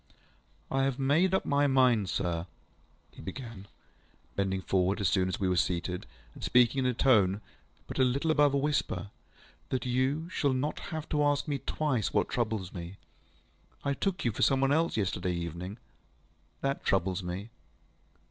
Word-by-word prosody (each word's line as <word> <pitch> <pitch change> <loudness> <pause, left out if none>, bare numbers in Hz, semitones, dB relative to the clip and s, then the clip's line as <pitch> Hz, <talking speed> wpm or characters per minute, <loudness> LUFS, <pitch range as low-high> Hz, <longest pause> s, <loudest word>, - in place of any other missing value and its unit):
ŌĆ£I 135 0 +2
have 135 -2 -1
made 145 +7 +3
up 190 - +1
my 145 0 +3
mind, 125 -7 +3
sir, 85 -2 -1 0.6
ŌĆØ - - -25
he - - -9
began, 100 +2 -8 0.7
bending 95 -1 -1
forward 95 +2 +1
as 100 - +2
soon 95 +1 +2
as 90 - -3
we 95 - +1
were 90 - +2
seated, 90 0 -1 0.3
and - - -11
speaking 125 +2 +4
in 130 - +1
a 125 - +2
tone 100 -7 +4 0.5
but - - -6
a - - +6
little 140 +6 +1
above 145 -2 +4
a - - +4
whisper, 140 -8 -1 0.6
ŌĆ£that 130 - -1
you 130 +6 0
shall 140 -6 +1
not 135 +4 -1
have 160 -2 -4
to 150 -1 +2
ask 145 +1 +1
me 145 -2 -1
twice 140 -8 -1
what - - +2
troubles 110 -7 -2
me. 90 +1 -7 0.9
I 140 - +1
took 185 +4 -2
you 120 - +3
for 105 - -5
some 135 -1 +4
one 135 0 +3
else 160 -3 +2
yesterday 90 -3 -1
evening. 85 +4 -5 0.8
That 135 0 -1
troubles 95 0 +1
me. 95 +5 -5
125 Hz, 175 wpm, -30 LUFS, 95-140 Hz, 0.9 s, a